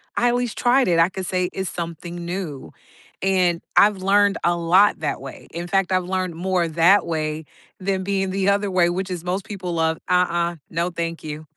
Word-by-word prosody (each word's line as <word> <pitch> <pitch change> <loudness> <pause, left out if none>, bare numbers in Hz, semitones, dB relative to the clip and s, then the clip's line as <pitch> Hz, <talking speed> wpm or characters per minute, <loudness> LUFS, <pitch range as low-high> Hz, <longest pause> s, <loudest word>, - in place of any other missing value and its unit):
I 245 - +3
always 245 -1 -1
tried 255 +2 +3
it. 165 -1 +3
I 165 - +5
could 190 0 -6
say 180 0 -1
it's 190 -2 -3
something 170 0 -6
new, 170 -6 -5 0.5
and 180 -3 +2 0.2
I've 205 -1 +6
learned 200 +1 +3
a 175 0 +2
lot 175 +4 +4
that 150 - -2
way. 135 0 -10
In 170 +1 -5
fact, 195 0 +1
I've 185 -1 +2
learned 185 -2 -2
more 180 0 0
that 170 +5 +4
way 155 -1 -2 0.3
than 190 0 -1
being 195 -1 -1
the 195 0 +1
other 200 0 +1
way, 175 -2 +3
which 185 +2 -3
is 175 -2 -4
most 185 +2 -2
people 185 -4 -5
love, 160 0 +1
"Uh-uh, 175 -1 +1
no, 170 +2 -1
thank 165 -1 -4
you." 155 0 -7
180 Hz, 195 wpm, -22 LUFS, 170-195 Hz, 0.5 s, I've